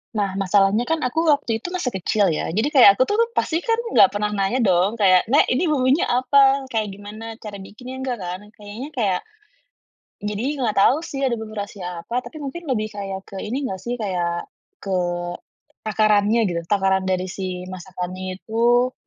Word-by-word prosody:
Nah, 200 -2 -1
masalahnya 195 +3 +3
kan 320 +5 -1
aku 320 +7 0
waktu 285 -8 +1
itu 355 - -5
masih 360 -7 -3
kecil 195 +2 +1
ya. - - -2
Jadi 220 - +1
kayak 250 -9 +7
aku 255 - +4
tuh 415 - 0 0.2
pasti 330 -6 -1
kan 455 -1 +1 0.2
nggak 255 - +7
pernah 210 +1 -1
nanya 195 +6 0
dong 195 +1 +2
kayak, 185 -3 +5
"Nek, 290 - +5
ini 260 +8 +1
bumbunya 265 +2 +3
apa? 270 +2 +3
Kayak 220 -4 -1
gimana 210 +2 -9
cara 210 -2 -8
bikinnya?" 215 +7 -9
nggak 250 -2 -2
kan. 180 0 -5
Kayaknya, 215 +6 -9
kayak 200 -9 0 1.0
jadi 210 +1 -3 0.2
nggak 220 -4 0
tahu 225 +7 +5
sih 275 -4 -3
ada 255 - +1
menu 215 -1 -8
rahasia 180 -4 -6
apa, 245 +6 -1
tapi 310 - -11
mungkin 305 +2 -6
lebih 215 -4 0
kayak 195 -1 -6
ke 195 - -8
ini 255 +6 -3
nggak 190 -6 -4
sih, 245 +3 -3
kayak 175 -5 -2 0.3
ke 195 - -5 0.9
takarannya 215 +1 +2
gitu. 170 -2 -1
Takaran 195 -2 +2
dari 185 0 0
si 185 -1 -5
masakannya 185 0 -6
itu, 240 +4 +2
215 Hz, 180 wpm, -22 LUFS, 190-255 Hz, 1.0 s, kayak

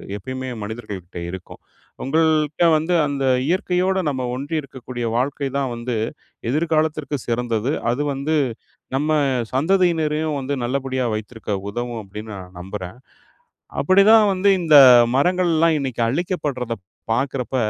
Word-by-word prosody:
எப்பயுமே 130 +5 -5
மனிதர்கள்கிட்ட 105 -5 -7
இருக்கும். 90 0 -9 0.4
உங்கள்ட்ட 155 +2 +2
வந்து 160 +3 0
அந்த 140 -1 -2 0.2
இயற்கையோட 185 +2 +1
நம்ம 130 -3 -2
ஒன்றி 140 +5 -4
இருக்கக்கூடிய 125 -3 -7
வாழ்க்கை 135 +2 -1
தான் 135 -3 -1
வந்து 120 +1 -3 0.6
எதிர்காலத்திற்கு 155 -1 0
சிறந்தது. 120 +1 -1 0.2
அது 125 +5 -1
வந்து 140 +4 -1 0.6
நம்ம 150 +3 0 0.4
சந்ததியினரையும் 160 -1 +1
வந்து 135 +2 -2
நல்லபடியா 130 0 -1
வைத்திருக்க 110 0 -6 0.2
உதவும் 120 +1 -4
அப்டின்னு 105 +3 -8
நான் 90 -1 -11
நம்புறேன். 95 +2 -7 0.8
அப்படி 185 +1 +5
தான் 220 -1 +7
வந்து 190 +2 +2
இந்த 155 -3 +6 0.4
மரங்கள்லாம் 165 0 +2
இன்னைக்கு 130 -4 -2
அழிக்கப்படுறத 140 -5 -2 0.4
பாக்குறப்ப 130 +1 -2
135 Hz, 115 wpm, -21 LUFS, 120-160 Hz, 0.8 s, தான்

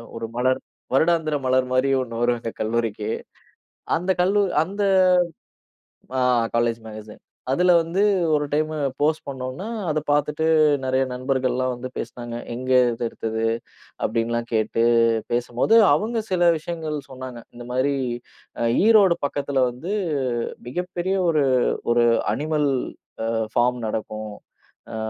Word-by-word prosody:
ஒரு 115 0 -4
மலர் 130 +1 +1 0.3
வருடாந்தர 160 +1 +2
மலர் 130 0 +2
மாரியே 135 +1 +2
ஒ்ண்ணு 115 -2 -5
வரும் 120 0 +2
எங்க 115 -1 -5
கல்லூரிக்கு. 110 -1 -1 0.9
அந்தக் 180 +2 -1
கல்லூ 200 +3 +3 0.2
அந்த 200 +4 -4 1.4
ஆ, - - +2 0.3
காலேஜ் 115 0 +1
மேகஸின். 110 -1 -10 0.3
அதுல 180 +5 +3
வந்து 170 +5 -1 0.3
ஒரு 150 0 +1
டைம் 155 +1 +1 0.3
போஸ்ட் 155 +1 +1
பண்ணோனா, 130 +7 -5 0.2
அத 155 - 0
பாத்துட்டு 150 +2 +1 0.4
நறைய 130 0 +1
நண்பர்கள்லாம் 130 0 -1
வந்து 125 +1 -6
பேசுனாங்க. 120 0 -6 0.2
"எங்க 130 +2 -5 0.2
இது 115 - -4
எடுத்தது?" 110 0 -3 0.6
அப்டின்னுலாம் 115 +1 -1
கேட்டுப் 115 +1 +2
பேசும்போது, 120 - +1 0.2
அவங்க 225 +8 -1
சில 175 -2 +4
விஷயங்கள் 160 -1 -4
சொன்னாங்க. 130 -2 -8
இந்த 120 0 -9
மாரி 135 +3 +1 0.9
ஈரோடு 205 -6 +6
பக்கத்துல 140 -1 0
வந்து 155 +11 -6 0.8
மிகப்பெரிய 180 +5 -2
ஒரு 155 -4 +3 0.5
ஒரு 120 0 +4 0.2
அ - - -11
அனிமல் 150 -1 0 0.9
ஃபார்ம் 125 0 +2
நடக்கும். 110 -1 -4 0.6
அ - - -3
130 Hz, 120 wpm, -23 LUFS, 120-155 Hz, 1.4 s, ஈரோடு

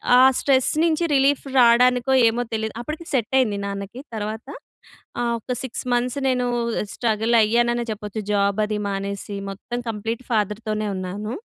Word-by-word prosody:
ఆహ్, 260 +1 +7
స్ట్రెస్ 265 -2 +2
నుంచి 335 0 +2
రిలీఫ్ 275 +1 +3
రావడానికో 250 +2 +5 0.2
ఏమో 235 +2 -2
తెలీదు. 220 0 -2
అప్పటికి 305 +7 -6
సెట్ 245 -2 0
అయింది 210 -6 +1
నాన్నకి. 200 +5 -6
తర్వాత 215 +3 -5 0.8
ఆహ్, 235 0 0
ఒక 230 - -7
6 255 -1 -5
మంత్స్ 245 +2 0
నేను 250 -1 +1 0.5
స్ట్రగల్ 225 0 +1
అయ్యాననె 240 +2 +1
చెప్పొచ్చు. 210 0 -5
జాబ్ 200 0 +1
అది 210 0 -2
మానేసి 200 +1 -4 0.2
మొత్తం 240 +5 -6
కంప్లీట్ 225 +3 -4
ఫాదర్‌తోనే 215 0 -1
ఉన్నాను. 200 +5 -4
225 Hz, 140 wpm, -22 LUFS, 210-250 Hz, 0.8 s, ఆహ్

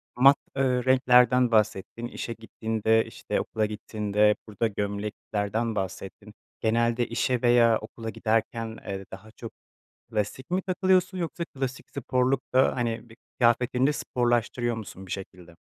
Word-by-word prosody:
mat, 135 +3 +7 0.2
ııı, 130 -2 +1
renklerden 125 -1 +5
bahsettin, 110 +1 0
işe 120 -1 -5
gittiğinde, 110 0 0
işte, - - -3
okula 110 -1 -1
gittiğinde, 105 0 +1
burada 110 +2 -1
gömleklerden 105 +2 -3
bahsettin. 95 +2 -5 0.3
Genelde 115 +1 +1
işe 115 +1 0
veya 120 -2 +5
okula 115 +1 -7
giderken, 115 0 -1
eee, 95 -1 -5
daha 110 +3 -11
çok 115 0 -9 0.6
klasik 110 +7 -3
mi 185 +1 +1
takılıyorsun 185 0 +1
yoksa 170 0 -3
klasik 135 -4 -5
sporluk 130 0 0
da, 130 +1 +4
hani, 115 -1 -2
bi 115 - -15 0.2
kıyafetini 125 +2 +3
de 150 - +2
sporlaştırıyor 120 -2 0
musun 95 -3 -8
bir - - -10
şekilde? 90 -3 -8
115 Hz, 135 wpm, -27 LUFS, 105-125 Hz, 0.6 s, mat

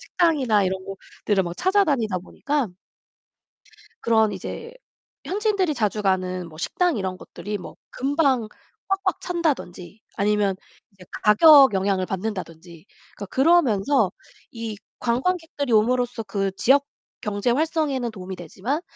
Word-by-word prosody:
식당이나 270 - +2
이런 190 0 -2
곳들을 195 0 -2
막 175 0 -6
찾아다니다 285 - +1
보니까 275 +7 -2 1.3
그런 220 -2 +3
이제 460 - -7 0.5
현지인들이 400 -5 0
자주 215 -3 -1
가는 185 -2 -1
뭐 155 - -14
식당 350 - 0
이런 185 -2 -3
것들이 205 +3 -6
뭐 - - -10 0.2
금방 275 -4 +1 0.4
꽉꽉 390 0 -1
찬다든지. 250 - -3 0.2
아니면 205 -1 +1 0.4
이제 190 -2 -17 0.2
가격 270 +3 +8
영향을 190 -1 +1
받는다든지. 180 -4 -6 0.3
그러니까 205 - -7
그러면서 265 - +3 0.4
이 230 -3 -6 0.2
관광객들이 285 +2 -1
옴으로써 245 +1 +2
그 195 -1 -2
지역 280 +3 +4 0.4
경제 210 +3 -1
활성에는 285 -4 0
도움이 190 -2 -7
되지만 195 - -4
220 Hz, 305 characters per minute, -23 LUFS, 195-285 Hz, 1.3 s, 가격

